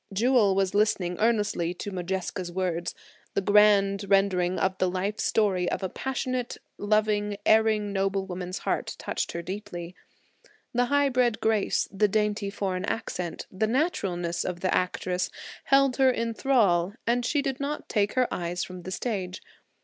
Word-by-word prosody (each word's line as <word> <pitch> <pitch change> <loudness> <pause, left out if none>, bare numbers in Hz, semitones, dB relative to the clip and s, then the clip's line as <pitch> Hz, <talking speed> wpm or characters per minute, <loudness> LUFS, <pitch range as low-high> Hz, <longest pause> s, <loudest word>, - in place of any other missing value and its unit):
Jewel 215 -1 +3
was 195 -1 +1
listening 200 -4 +1
earnestly 210 -6 +1
to 205 - -6
Modjeska's 185 -1 -3
words; 175 -2 -2 0.4
the - - +3
grand 200 0 +4
rendering 185 -2 +2
of 190 0 +1
the 185 - +2
life 195 +4 -2
story 190 -5 +1
of - - -3
a 190 - -1
passionate, 255 0 -3 0.2
loving, 210 -1 +1
erring, 215 -2 +3
noble 195 0 0
woman's 180 0 -5
heart - - -2
touched - - -3
her 170 - -4
deeply. 175 -2 -6 0.8
The 245 0 +2
high 285 +2 +2
bred 245 -3 +1
grace, 220 -2 +1
the 210 +2 +2
dainty 210 0 0
foreign 190 -2 -2
accent, 180 -6 -4
the 205 +3 0
naturalness 190 - -1
of 175 -1 -4
the 185 - +1
actress, 180 0 0 0.4
held 275 -1 +4
her 265 -1 +5
in 230 -2 -1
thrall 205 -9 +2
and 240 +1 +1
she 280 +4 +1
did 270 -2 -2
not 290 +1 -3
take 205 -2 +1
her 255 -1 +2
eyes 175 0 -2
from 180 -1 -8
the 185 - -7
stage. 190 -4 -3
200 Hz, 155 wpm, -27 LUFS, 185-225 Hz, 0.8 s, her